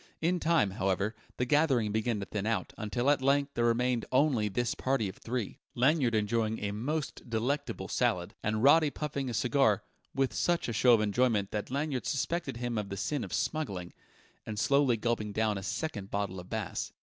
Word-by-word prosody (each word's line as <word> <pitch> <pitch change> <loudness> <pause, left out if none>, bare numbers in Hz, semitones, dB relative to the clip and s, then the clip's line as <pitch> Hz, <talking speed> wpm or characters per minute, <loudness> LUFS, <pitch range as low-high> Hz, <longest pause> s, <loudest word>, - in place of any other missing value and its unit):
In 175 +2 +1
time, 160 - +2
however, 95 +1 0 0.2
the 125 - +1
gathering 135 -6 +3
began 110 +1 0
to - - -3
thin 105 +1 -3
out, 115 - -1
until 120 +4 -2
at 145 - +1
length 140 +1 +2
there 120 - +1
remained 120 0 +1
only 130 -6 +3
this 120 +4 -1
party 130 -5 0
of 95 - -8
three, 120 -3 -4 0.2
Lanyard 130 -2 +3
enjoying 110 +1 +1
a 100 -1 -3
most 140 +7 -3
delectable 125 +6 -2
salad, 90 -1 0
and 110 +1 -1
Roddy 150 +2 +6
puffing 140 -2 -3
a - - -4
cigar 125 -4 +2 0.3
(with 135 -1 +1
such 175 -1 +1
a 115 - -2
show 120 +2 +5
of 110 - +1
enjoyment 105 -1 +1
that 105 -1 -3
Lanyard 140 -1 -2
suspected 160 -2 -1
him 120 -2 -2
of 100 -2 -5
the 100 - -5
sin 145 +6 -1
of - - -7
smuggling) 100 - -2 0.5
and 110 - -6
slowly 140 0 +3
gulping 110 -2 -1
down 110 0 +1
a 95 - -4
second 105 - -4
bottle 100 -2 -2
of 90 - -11
Bass. 110 -4 -3
120 Hz, 190 wpm, -30 LUFS, 105-140 Hz, 0.5 s, Roddy